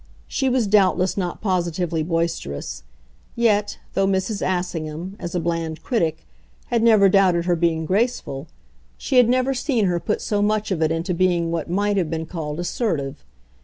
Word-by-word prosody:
She 265 Hz, -, 0 dB
was 250 Hz, -2 st, +2 dB
doubtless 190 Hz, -2 st, +3 dB
not 180 Hz, -3 st, -3 dB
positively 175 Hz, -4 st, -1 dB
boisterous; 165 Hz, -, -2 dB, 0.5 s
yet, 210 Hz, -3 st, +2 dB, 0.2 s
though 195 Hz, -, +2 dB
Mrs. 195 Hz, +2 st, -1 dB
Assingham, 175 Hz, -1 st, -3 dB
as 175 Hz, -1 st, -5 dB
a -, -, +2 dB
bland 165 Hz, -1 st, -3 dB
critic, 170 Hz, -11 st, -1 dB, 0.4 s
had 235 Hz, -1 st, +1 dB
never 220 Hz, -4 st, +6 dB
doubted 185 Hz, -3 st, +3 dB
her 175 Hz, -1 st, +2 dB
being 165 Hz, -1 st, 0 dB
graceful, 190 Hz, -, -1 dB, 0.5 s
she 260 Hz, -, 0 dB
had 245 Hz, -2 st, +6 dB
never 255 Hz, +2 st, +2 dB
seen 250 Hz, -4 st, 0 dB
her 175 Hz, -2 st, +1 dB
put 210 Hz, +4 st, -1 dB
so 205 Hz, -1 st, -1 dB
much 210 Hz, 0 st, 0 dB
of 170 Hz, -4 st, -1 dB
it 160 Hz, 0 st, +2 dB
into 165 Hz, +3 st, -1 dB
being 170 Hz, -1 st, +1 dB
what 165 Hz, -1 st, -3 dB
might 205 Hz, +3 st, +1 dB
have 175 Hz, -5 st, 0 dB
been 160 Hz, 0 st, -3 dB
called 155 Hz, -2 st, -5 dB
assertive. 160 Hz, -, -2 dB
180 Hz, 165 wpm, -22 LUFS, 165-205 Hz, 0.5 s, never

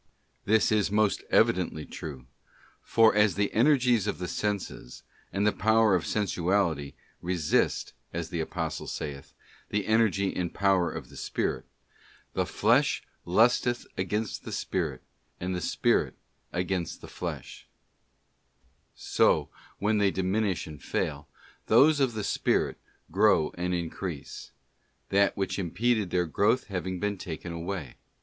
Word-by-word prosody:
This 110 Hz, +1 st, +3 dB
is 105 Hz, -1 st, +2 dB
most 105 Hz, 0 st, +1 dB
evidently 85 Hz, -4 st, +2 dB
true, 70 Hz, -5 st, -8 dB, 0.6 s
for 115 Hz, -1 st, +4 dB
as 105 Hz, -1 st, +3 dB
the 100 Hz, 0 st, 0 dB
energies 125 Hz, -3 st, +3 dB
of -, -, -1 dB
the 90 Hz, -, -4 dB
senses, 100 Hz, -13 st, -4 dB, 0.3 s
and 100 Hz, +1 st, 0 dB
the 105 Hz, -, +4 dB
power 110 Hz, -1 st, +3 dB
of 90 Hz, -3 st, +1 dB
sensuality, 90 Hz, -7 st, 0 dB, 0.3 s
resist, 85 Hz, -3 st, 0 dB, 0.2 s
as 85 Hz, -1 st, -4 dB
the 85 Hz, -, -2 dB
Apostle 80 Hz, -, -3 dB
saith, 70 Hz, -2 st, -6 dB, 0.3 s
the 105 Hz, -1 st, -1 dB
energy 110 Hz, -3 st, +2 dB
and 90 Hz, -2 st, -2 dB
power 95 Hz, -3 st, +3 dB
of -, -, -7 dB
the -, -, -14 dB
spirit, -, -, -2 dB, 0.4 s
' -, -, -28 dB
the -, -, 0 dB
flesh -, -, +2 dB, 0.2 s
lusteth 120 Hz, +5 st, +3 dB
against 105 Hz, +3 st, -2 dB
the -, -, -7 dB
spirit, -, -, -2 dB, 0.4 s
and 90 Hz, +1 st, -2 dB
the 90 Hz, -, -2 dB
spirit -, -, +1 dB, 0.4 s
against 90 Hz, -1 st, -2 dB
the -, -, -10 dB
flesh -, -, -7 dB, 0.4 s
;' -, -, -44 dB
* -, -, -40 dB
so -, -, +2 dB, 0.3 s
when 105 Hz, +1 st, +1 dB
they 100 Hz, -1 st, +4 dB
diminish 95 Hz, 0 st, 0 dB
and 75 Hz, -3 st, -10 dB
fail, 75 Hz, -1 st, -2 dB, 0.4 s
those 150 Hz, +1 st, +6 dB
of 130 Hz, -4 st, +2 dB
the 110 Hz, -1 st, -3 dB
spirit -, -, 0 dB, 0.3 s
grow 75 Hz, -, +4 dB
and 90 Hz, +1 st, -1 dB
increase; 85 Hz, -2 st, -5 dB, 0.6 s
that 100 Hz, 0 st, +3 dB
which 95 Hz, 0 st, -1 dB
impeded 105 Hz, +3 st, 0 dB
their 90 Hz, 0 st, +1 dB
growth 105 Hz, +10 st, +2 dB
having 95 Hz, -1 st, -3 dB
been 105 Hz, -1 st, -2 dB
taken 85 Hz, 0 st, -6 dB
away. 85 Hz, -5 st, -5 dB
95 Hz, 140 wpm, -28 LUFS, 85-105 Hz, 0.6 s, those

